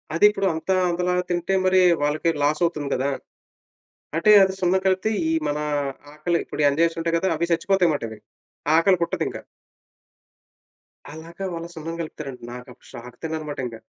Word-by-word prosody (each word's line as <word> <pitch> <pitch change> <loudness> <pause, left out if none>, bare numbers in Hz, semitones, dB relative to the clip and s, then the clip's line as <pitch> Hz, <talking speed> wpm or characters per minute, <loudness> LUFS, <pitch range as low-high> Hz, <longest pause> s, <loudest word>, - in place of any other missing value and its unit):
అదిప్పుడు 200 +2 +4
అంతా 160 +4 -1
అంతలా 180 +1 0 0.2
తింటే 175 +2 0
మరి, 185 0 +4 0.2
వాళ్ళకి 150 +3 +1
లాస్ 150 +2 +1
అవుతుంది 150 -4 -2
కదా! 135 +2 0 1.1
అంటే 210 +6 +4
అది 190 0 +1
సున్నం 185 +1 +2
కలిపితే 190 +2 +2 0.2
ఈ - - +1 0.2
మన 145 - -1 0.6
ఆకలి 170 +3 0
ఇప్పుడు - - -4
ఎంజైమ్స్ 165 +3 +1
ఉంటాయి 165 0 0
కదా! 190 +3 0
అవి 170 +2 -2
సచ్చిపోతాయి 175 +1 +2
మాటవి. 115 -6 -5 0.6
ఆకలి 185 +3 +4
పుట్టదింక. 170 - -2 1.7
అలాగా 165 +4 -8
వాళ్ళ 165 0 -5
సున్నం 165 +1 -5
కలుపుతారంట. 150 -5 -7
నాకప్పుడు 125 0 -12
షాక్ 125 +1 -10
తిన్నానుమాటింక. 150 -6 -4
165 Hz, 140 wpm, -23 LUFS, 150-180 Hz, 1.7 s, అదిప్పుడు